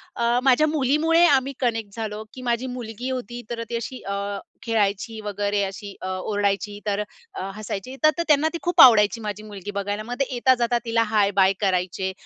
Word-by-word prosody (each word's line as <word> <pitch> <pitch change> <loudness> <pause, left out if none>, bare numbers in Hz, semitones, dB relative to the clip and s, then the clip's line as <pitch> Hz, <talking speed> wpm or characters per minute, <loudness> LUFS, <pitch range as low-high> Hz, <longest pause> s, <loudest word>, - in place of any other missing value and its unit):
अ, 235 +1 +2
माझ्या 270 +3 +4
मुलीमुळे 310 +4 +3
आम्ही 275 -3 +3
कनेक्ट 225 -5 -2
झालो, 215 -1 -4
की 255 - -9
माझी 240 +1 -1
मुलगी 235 +2 -5
होती 245 -1 -5
तर, 230 -1 -3
ती 235 - -3
अशी 235 +2 -5
अ, 200 - -1 0.5
खेळायची 220 0 -1
वगैरे, 205 0 -1
अशी 195 +1 -6
अ, 185 - -4
ओरडायची 205 +2 -1
तर 205 -1 0 0.3
अ, - - -6
हसायची. 215 +4 -6
तर 310 - +8
तर 340 - +1
त्यांना 300 0 +4
ती - - -2
खूप 350 -1 +4
आवडायची, 225 -1 +7
माझी 210 0 -5
मुलगी 205 -1 -8
बघायला. 205 +1 -2
मग 240 - -5
ते 275 - +2
येता-जाता 245 -1 +2
तिला 230 0 +2
हाय-बाय 200 -3 +3
करायचे. 190 -1 0
225 Hz, 180 wpm, -23 LUFS, 205-255 Hz, 0.5 s, तर